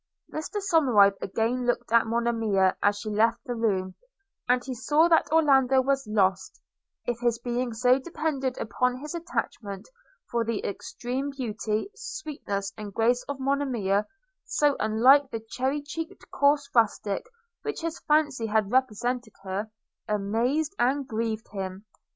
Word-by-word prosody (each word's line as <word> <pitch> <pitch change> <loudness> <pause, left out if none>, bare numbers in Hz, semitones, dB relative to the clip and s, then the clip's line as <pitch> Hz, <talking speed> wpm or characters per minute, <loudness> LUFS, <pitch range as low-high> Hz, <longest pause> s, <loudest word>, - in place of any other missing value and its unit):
Mr 310 +6 -5
Somerive 265 - +4
again 235 +5 -1
looked 245 -1 -1
at 230 0 +4
Monimia 225 -5 +1
as 205 0 +3
she 215 +1 -5
left 225 +3 +3
the 245 - -3
room, 195 -5 0 0.6
and 250 0 +3
he 265 - -4
saw 295 +7 +3
that 330 -3 +3
Orlando 270 -5 +5
was 270 -1 0
lost, 190 -3 +1 0.5
if 240 -1 -2
his 240 -1 +1
being 240 +1 -2
so 250 +3 +4
depended 275 -4 -2
upon 250 +3 0
his 300 +4 -7
attachment; 240 - -4 0.4
for 235 -1 +1
the 230 -2 -2
extreme 250 +6 -4
beauty, 225 - -3
sweetness 240 - -5
and 210 -2 -7
grace 240 +2 +2
of 285 -1 -4
Monimia, 250 -8 0 0.4
so 290 -2 +2
unlike 255 +6 +5
the 225 - -4
cherry 270 +3 -1
cheeked 325 +5 -7
coarse 285 0 +3
rustic 215 - +1 0.3
which 435 - -4
his 330 0 -3
fancy 295 -6 +1
had 215 -1 +1
represented 245 -2 0
her, 195 +3 -3 0.4
amazed 230 - 0
and 265 +2 +1
grieved 225 0 -2
him. 190 0 -6
245 Hz, 140 wpm, -27 LUFS, 215-275 Hz, 0.6 s, Orlando